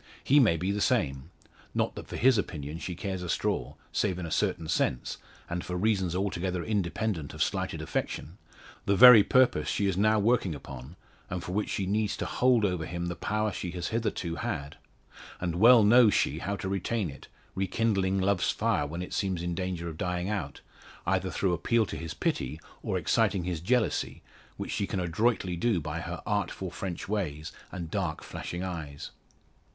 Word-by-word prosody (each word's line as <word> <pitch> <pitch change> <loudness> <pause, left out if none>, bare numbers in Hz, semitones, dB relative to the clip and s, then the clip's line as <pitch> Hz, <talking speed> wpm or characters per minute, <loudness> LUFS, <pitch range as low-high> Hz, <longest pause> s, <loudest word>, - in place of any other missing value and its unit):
He 145 +2 +5
may 105 -11 +4
be 90 +4 -1
the 105 +1 -1
same. 75 - +1 0.5
Not - - +1
that - - -8
for - - -7
his 125 -2 +5
opinion 75 -4 -4
she 90 0 -5
cares 95 +1 -4
a 90 - -5
straw 65 -2 -1 0.2
save 90 - 0
in 90 - -4
a 80 - -6
certain 80 - 0
sense, 65 -4 0 0.3
and 85 0 -3
for 90 - -4
reasons 95 -3 +1
altogether 90 -2 -1
independent 100 -4 -2
of - - +2
slighted - - -2
affection 85 +7 -4 0.5
the 100 - +4
very 125 0 +11
purpose 125 -8 +3
she 100 - 0
is 95 -2 0
now 110 +2 +4
working 105 -5 +2
upon, 70 +2 -9 0.3
and 90 -1 -4
for - - -5
which 105 +3 -1
she 95 - -1
needs 105 +2 0
to - - -3
hold 125 -4 +3
over 90 -4 -1
him 85 +1 -3
the 85 - -3
power 105 +4 -1
she 90 - -4
has 90 -1 -3
hitherto 100 -7 -2
had. 70 -2 -4 0.6
And 85 -1 -2
well 115 +3 +8
knows 115 0 +6
she 75 - +1
how 100 +3 -2
to 100 - -5
retain 95 -1 -1
it, 70 - -13 0.3
rekindling 95 0 +1
love's 95 -1 +2
fire 75 - +1
when 85 +4 -4
it - - -8
seems 95 -4 -1
in 85 0 -2
danger 90 -1 -3
of 80 -2 -7
dying 90 +1 -1
out, 95 -10 -3 0.4
either - - +1
through 95 -3 0
appeal 115 +7 +2
to - - -6
his 80 -2 -6
pity, 70 +4 -2 0.2
or - - -1
exciting 95 - +2
his 85 -2 -2
jealousy, 120 +4 0 0.3
which - - -4
she 100 - -1
can 95 - -2
adroitly 90 +1 +1
do, 100 +2 +1
by 75 -1 -4
her - - -6
artful - - -2
French 90 -3 -5
ways 80 -7 -3 0.2
and 85 -3 -6
dark 85 -7 -2
flashing 85 +1 -5
eyes. 80 -6 -6
90 Hz, 190 wpm, -29 LUFS, 85-105 Hz, 0.6 s, very